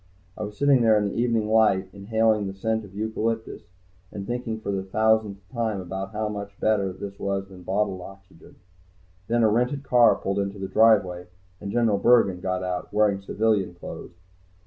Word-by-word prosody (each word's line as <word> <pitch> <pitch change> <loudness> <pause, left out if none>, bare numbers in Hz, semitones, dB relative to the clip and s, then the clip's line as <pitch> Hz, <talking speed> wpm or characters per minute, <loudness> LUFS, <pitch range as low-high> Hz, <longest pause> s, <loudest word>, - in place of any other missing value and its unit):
I - - -8
was 105 0 -6
sitting 140 -3 +4
there 110 -2 +5
in 105 -1 0
the - - -6
evening 115 -3 +1
light, 105 -4 +3
inhaling 110 +1 +1
the 95 - -6
scent 110 +2 -1
of 100 -1 -14
eucalyptus 110 +1 -3 0.5
and 100 -1 -6
thinking 120 -1 -3
for 105 - -4
the 95 -1 -1
thousandth 105 -1 0
time 115 -4 -1
about 95 +2 -5
how 105 0 -2
much 100 -1 -7
better 100 -3 +1
this 100 +2 -8
was 100 0 -2
than 95 -2 -12
bottled 95 +1 -1
oxygen. 95 0 -14 0.7
Then 120 +1 +2
a - - +6
rented 125 +6 0
car 120 -3 +5
pulled 100 +1 -2
into 100 0 -3
the 95 -1 -4
driveway, 100 -5 +3 0.3
and 100 -1 -6
General 115 -4 +2
Bergen 100 -5 +4
got 95 0 -2
out, 90 -1 -4
wearing 105 -2 +2
civilian 100 -3 0
clothes. 85 - -9
105 Hz, 180 wpm, -25 LUFS, 95-110 Hz, 0.7 s, a